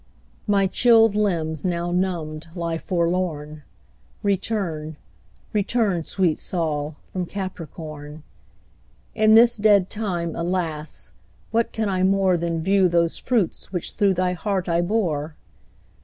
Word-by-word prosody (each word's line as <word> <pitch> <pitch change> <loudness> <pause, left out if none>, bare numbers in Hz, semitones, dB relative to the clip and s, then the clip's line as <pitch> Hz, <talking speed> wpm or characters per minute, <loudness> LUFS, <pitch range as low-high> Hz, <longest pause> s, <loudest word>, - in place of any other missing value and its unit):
My 200 -1 +3
chilled 225 +2 +5
limbs 165 -8 -1
now 175 -1 -1
numbed 170 -4 -2
lie 170 -2 -2
forlorn; 170 -4 -2 0.6
Return; 185 -6 -2 0.6
return, 205 -4 +1
sweet 180 -5 +1
Sol, 155 -4 -1 0.2
from 180 -2 -2
Capricorn; 155 -5 -7 0.9
In 215 0 +5
this 235 +1 +6
dead 205 -3 +4
time, 175 -6 -2
alas, 170 -3 -3 0.4
what 230 0 +1
can 220 -1 -1
I 185 -2 0
more 190 -1 +3
Than 165 -1 -2
view 195 +1 +4
those 170 -1 +1
fruits 225 -9 -1
which 180 -3 -3
through 200 -2 +2
thy 180 0 +1
heart 190 0 -2
I 170 0 +2
bore? 170 -6 -1
180 Hz, 120 wpm, -23 LUFS, 165-200 Hz, 0.9 s, this